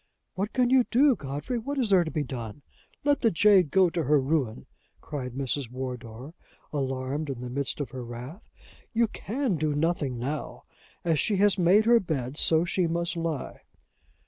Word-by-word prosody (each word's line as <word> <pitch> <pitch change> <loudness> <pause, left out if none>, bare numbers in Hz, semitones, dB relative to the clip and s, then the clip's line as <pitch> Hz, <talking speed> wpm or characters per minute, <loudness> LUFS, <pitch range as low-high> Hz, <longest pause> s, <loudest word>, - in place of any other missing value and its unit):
"What 200 +3 -3
can 250 -1 +2
you 260 -2 +5
do, 265 +2 +5
Godfrey? 145 - -4
What 280 +5 -4
is 240 -6 +1
there 185 -3 +6
to 160 - -4
be 155 -2 -2
done? 125 -1 -7 0.4
Let 290 0 +2
the 230 - +4
jade 190 -3 +5
go 185 -1 +4
to 165 -3 -1
her 150 +2 +4
ruin!" 130 - -1 0.3
cried 130 -4 -6
Mrs. 135 -1 -2
Wardour, 125 +1 -7 0.4
alarmed 135 +1 -2
in 130 -3 -5
the 125 -1 -6
midst 140 +3 -2
of 145 - -4
her 130 -2 -6
wrath. 120 - -9 0.5
"You 230 0 +4
can 225 - -2
do 150 -1 0
nothing 145 -5 0
now. 140 +5 -4 0.4
As 165 -3 +2
she 210 - +1
has 200 0 +3
made 190 +5 +5
her 235 0 +6
bed, 145 - -3
so 160 +1 +3
she 175 0 0
must 170 +1 -1
lie." 165 -4 -4
155 Hz, 180 wpm, -27 LUFS, 130-195 Hz, 0.5 s, there